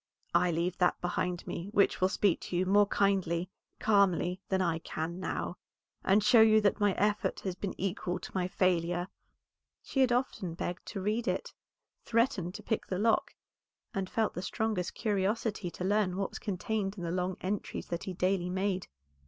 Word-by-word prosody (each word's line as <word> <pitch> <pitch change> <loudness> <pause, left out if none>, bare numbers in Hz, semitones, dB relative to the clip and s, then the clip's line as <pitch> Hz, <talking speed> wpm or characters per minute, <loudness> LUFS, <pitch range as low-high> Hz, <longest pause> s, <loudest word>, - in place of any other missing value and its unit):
"I 180 - +4
leave 170 +2 -1
that 180 -1 +3
behind 175 0 -2
me 170 +2 -5
which 200 -2 +3
will 185 - +4
speak 200 -2 +2
to - - -5
you 185 - +2
more 205 +2 +5
kindly, 185 -3 +1 0.3
calmly, 195 -3 +2
than 190 - +2
I 170 -3 +1
can 165 +2 -4
now, - - -3 0.5
and 195 +2 +4
show 220 +2 +7
you 220 0 +7
that 205 +1 +2
my 205 -2 +3
effort 210 0 0
has 190 - -2
been 185 +1 -5
equal 180 -1 -2
to - - -9
my 180 -1 0
failure." 175 -1 +1 0.7
She 270 - -3
had 255 -2 +4
often 240 -9 -1
begged 175 +1 -4
to 195 - -4
read 215 +4 -1
it, - - -2 0.5
threatened 225 -7 +1
to 210 - -8
pick 220 - -2
the 185 - -2
lock, 220 +3 +2 0.6
and 190 -1 -2
felt 220 -1 0
the 180 - -4
strongest 205 -2 -2
curiosity 205 -1 0
to 180 - -7
learn 195 -1 +1
what 195 -1 -1
was - - -8
contained 205 0 -2
in 175 - -5
the 170 - -2
long 180 +1 -1
entries 200 +2 -3
that 170 0 -3
he 190 - -4
daily 180 0 0
made. 190 0 -1
190 Hz, 185 wpm, -31 LUFS, 180-210 Hz, 0.7 s, show